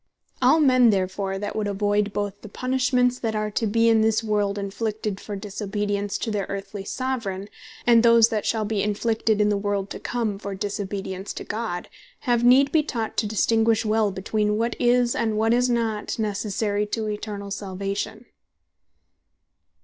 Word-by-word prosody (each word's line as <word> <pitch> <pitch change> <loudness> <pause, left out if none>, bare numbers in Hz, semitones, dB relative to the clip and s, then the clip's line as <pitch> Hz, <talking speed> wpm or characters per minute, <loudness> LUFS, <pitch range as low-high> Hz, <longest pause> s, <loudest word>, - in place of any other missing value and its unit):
All 265 +6 +5
men 255 -5 +5
therefore 195 -1 -1
that 205 +1 -4
would 215 -1 -1
avoid, 205 +1 0
both 205 0 -3
the 215 - -10
punishments 250 +1 +1
that 225 -2 -2
are 215 0 -1
to 220 +2 0
be 230 +2 +3
in 225 -1 +5
this 220 0 +2
world 205 -2 0
inflicted, 210 0 -3
for 205 - -6
disobedience 205 0 -3
to 225 - -3
their 205 -2 -2
earthly 200 0 -5
Soveraign, 215 -6 -3 0.4
and 235 -1 +6
those 230 -1 +6
that 215 -2 -1
shall 220 -2 0
be 210 -1 -1
inflicted 220 +1 0
in 210 0 +3
the 205 - +1
world 200 -1 -2
to - - -5
come 225 -5 -2
for 200 -1 -5
disobedience 195 -1 -4
to - - -6
God, 215 -6 -4 0.3
have 240 -3 +1
need 265 +3 +6
be 320 - +4
taught 230 -7 -4
to 215 - +1
distinguish 225 +2 +2
well 215 -1 +2
between 210 +2 -1
what 230 +1 0
is, 245 0 +3
and 220 -2 0
what 225 +1 +3
is 250 +1 +2
not 225 -3 -1
Necessary 210 -1 -1
to 220 0 -2
Eternall 210 -1 -5
Salvation. 200 +3 -4
215 Hz, 170 wpm, -24 LUFS, 200-230 Hz, 0.4 s, and